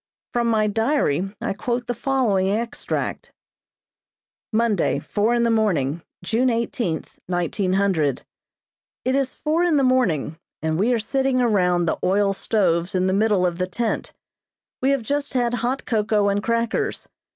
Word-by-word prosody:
From 240 -1 +1
my 220 -2 +2
diary 210 - +1
I - - -2
quote 240 +4 -2
the 245 - -2
following 235 -7 +1
extract: 230 +4 -3 1.2
"Monday, 220 -4 +1
four 220 +3 0
in 235 - +2
the 235 - +2
morning, 170 -9 +1 0.2
June 230 +7 +1
eighteenth, 230 -7 -2
1900. 180 - 0 0.8
It 255 - +1
is 270 -1 0
four 315 +3 0
in 340 -4 +3
the 275 - +3
morning 180 - +1 0.2
and 160 +1 -1
we 225 +6 +2
are 240 - +3
sitting 265 +3 0
around 180 -7 +2
the 160 - -1
oil 195 +1 +2
stoves 185 -3 0
in 185 0 +2
the 190 - +1
middle 205 -2 +2
of 175 0 -1
the 180 - 0
tent. 225 +4 -2 0.7
We 265 - +2
have 275 -3 +1
just 285 +3 -2
had 240 -1 +1
hot 250 +3 -1
cocoa 210 -2 +1
and 200 +1 0
crackers. 230 +1 -1
215 Hz, 150 wpm, -22 LUFS, 185-245 Hz, 1.2 s, in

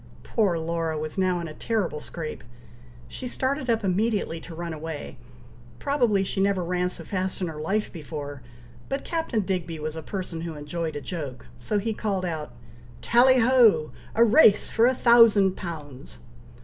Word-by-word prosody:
Poor 200 -7 +1
Laura 165 -1 -2
was 155 0 -4
now 185 -2 +1
in 170 - -4
a 155 - -8
terrible 200 -6 -2
scrape; 155 +1 -7 0.6
she 250 - -6
started 260 +1 -2
up 225 -1 +2
immediately 200 -3 0
to 165 +1 -10
run 170 0 -4
away. 155 -1 -6 0.6
Probably 240 -9 +1
she 195 0 -2
never 195 -2 +2
ran 180 +1 0
so - - -8
fast 185 -1 -3
in 185 - -1
her 155 -3 -6
life 205 +7 -1
before, 145 -4 -7 0.5
but 275 +1 -3
Captain 320 -9 -1
Digby 180 -4 -3
was 155 0 -4
a 160 - -5
person 180 -1 -5
who 165 -1 -5
enjoyed 155 +2 -4
a 145 - -4
joke, 140 -3 -6
so 120 - -1
he 220 +2 -1
called 195 -3 -2
out 160 -3 -4 0.5
"Tally 255 +2 +5
ho! 230 -10 +5 0.2
a 230 - +6
race 225 -3 +5
for 230 +2 +4
a 260 - +2
thousand 230 -6 +6
pounds!" 145 - -8
180 Hz, 170 wpm, -25 LUFS, 160-220 Hz, 0.6 s, a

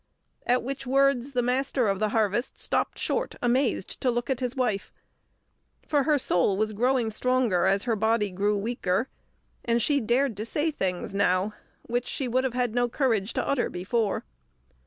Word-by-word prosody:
At 250 0 +3
which 270 +1 -5
words 275 0 +2
the 245 -1 +1
Master 255 0 +1
of 195 -1 0
the 215 - +1
Harvest 220 +2 0
stopped - - -1
short, 485 - -2
amazed, 245 -4 0
to 255 - +2
look 240 +2 -1
at 260 - -1
his 250 0 -3
wife, 230 -7 -1 1.0
for 285 -3 +2
her 300 -1 +3
soul 190 -6 +2
was 215 +1 0
growing 245 +1 +1
stronger 240 -6 +1
as 195 +1 +2
her 235 -2 0
body 220 -1 +1
grew 205 +3 0
weaker, 225 +1 -1 0.5
and 235 0 +1
she 285 +4 +2
dared 240 +1 +1
to 210 - -3
say 310 +6 0
things 190 -8 -3
now 195 +1 +1 0.3
which 245 +1 -2
she 270 - -2
would 255 +2 +1
have 250 -2 -2
had 245 -3 0
no 245 0 +1
courage 230 -6 0
to - - -2
utter 280 -3 +1
before. 200 +4 -1
240 Hz, 180 wpm, -27 LUFS, 210-260 Hz, 1.0 s, At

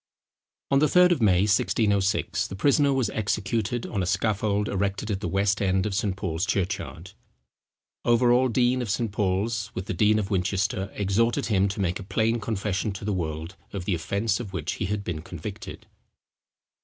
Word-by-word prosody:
On 135 - +5
the 150 - +4
third 180 +3 +5
of 170 - +1
May 95 -4 +4
1606, 100 -1 +1
the 95 - -7
prisoner 140 +6 +3
was 135 -3 +1
executed 110 +2 -1
on 100 - -2
a 90 - -1
scaffold 105 0 0
erected 100 +2 -2
at 95 - -1
the 105 - -3
west 100 +1 +1
end 95 -1 +1
of 105 - -2
St. 100 -1 0
Paul's 95 -2 -2
church 95 -3 0
yard. 90 +4 -9 0.9
Overal, 120 +1 +4
dean 125 +1 +2
of 120 - -4
St. 115 +1 -1
Paul's, 105 +2 -1
with 95 - -4
the - - -3
dean 105 +4 +3
of 105 -1 -2
Winchester, 95 +1 0
exhorted 105 +4 +1
him 95 0 +3
to 100 +1 -3
make 90 -1 -1
a - - -7
plain 115 +4 0
confession 105 -2 -2
to 95 - -7
the 105 - 0
world 80 0 -4 0.2
of 95 -3 -4
the 100 - 0
offence 100 +6 -1
of 105 -6 -7
which 85 -1 -2
he 100 - -3
had 105 0 -2
been 85 -5 -4
convicted. 90 +5 -8
100 Hz, 185 wpm, -26 LUFS, 95-110 Hz, 0.9 s, On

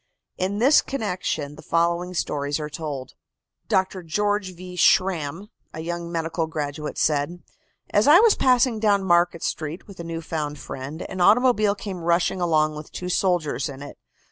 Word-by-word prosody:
In 190 +2 -1
this 265 +7 +5
connection 180 - -3
the - - -12
following 170 +2 0
stories 145 -2 -1
are 150 0 -5
told: 145 -4 -6 0.5
Dr. 190 0 0
George 205 +2 -1
V. 180 +1 -9
Schramm, 180 +1 +2 0.3
a 160 - -5
young 170 +1 -4
medical 165 0 -2
graduate, 150 -1 -4
said: 155 +4 0 0.5
"As 205 +4 +3
I 310 +5 +9
was 445 -1 +6
passing 250 -3 +3
down 205 -2 +2
Market 175 -2 +2
Street 155 +2 -4
with 200 -3 -14
a - - -5
new 165 0 -5
found 150 -2 -3
friend, 140 +3 -7
an 185 -1 -5
automobile 215 0 +4
came 195 -3 -6
rushing 170 +2 +1
along 155 -3 +2
with 150 0 -9
two 180 - -5
soldiers 170 -9 0
in 140 0 -8
it. 145 - -11
175 Hz, 165 wpm, -24 LUFS, 155-195 Hz, 0.5 s, I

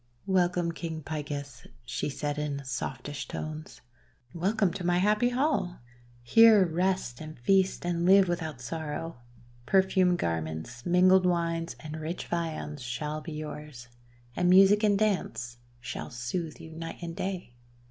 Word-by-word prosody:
"Welcome, 180 -2 +2
King 160 -1 -5
Picus," 145 -2 -5 0.2
she 120 - -2
said, 145 +1 -3
in 140 -2 -3
softest 135 +2 -5
tones. 155 0 -6 0.5
"Welcome 190 +1 +1
to 190 -1 -5
my 175 0 +2
happy 210 +5 +3
hall! 250 - 0 0.5
Here 215 - +7
rest, 175 -7 -1
and 155 0 -8
feast, 190 +9 +2
and 170 -1 0
live 190 +1 +6
without 160 -6 -3
sorrow. 160 +3 -5 0.5
Per 190 -1 +5
fumed 185 -2 +2
garments, 80 - -3
mingled 185 +1 +5
wines, 170 -1 -1
and 155 0 -7
rich 165 +3 -4
viands 160 -4 -3
shall 150 +5 -4
be 160 0 -7
yours, 150 -5 -7 0.5
and 180 0 +2
music 195 +3 +7
and 205 -2 +4
dance 185 - -1 0.2
shall 120 - -6
sooth 135 +7 -4
you 160 - -10
night 165 +1 -7
and 165 -1 -5
day. 185 -9 -4
165 Hz, 140 wpm, -29 LUFS, 145-185 Hz, 0.5 s, Here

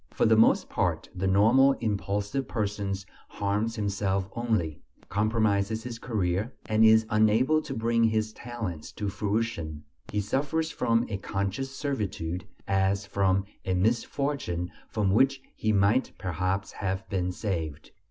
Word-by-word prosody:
For - - +1
the 110 - +5
most 110 - +4
part - - -1
the 95 +1 -1
normal 115 +8 +5
impulsive 105 +3 -2
person 100 -3 -2 0.3
harms 105 +3 -1
himself 100 -2 -1
only, 110 -11 -1 0.3
compromises 110 0 +1
his 120 -1 -6
career, 105 -1 -1
and 110 0 +3
is 110 0 +6
unable 110 +8 +4
to 145 - -6
bring 115 0 +2
his 110 -1 0
talents 110 -11 -6
to 105 -2 -3
fruition; 100 -7 -2 0.3
he 105 - 0
suffers 145 +10 -1
from 115 +1 +1
a 100 - -3
conscious 100 +7 -2
servitude, 105 - -3 0.2
as 95 +1 +1
from 95 -1 +1 0.2
a 95 - 0
misfortune 110 -3 0 0.2
from 105 -3 +1
which 135 +6 +4 0.2
he 110 - 0
might 105 +5 +3
perhaps 95 +3 -2
have 95 -1 -3
been 90 -2 -1
saved. 80 -7 -4
105 Hz, 135 wpm, -28 LUFS, 95-115 Hz, 0.3 s, is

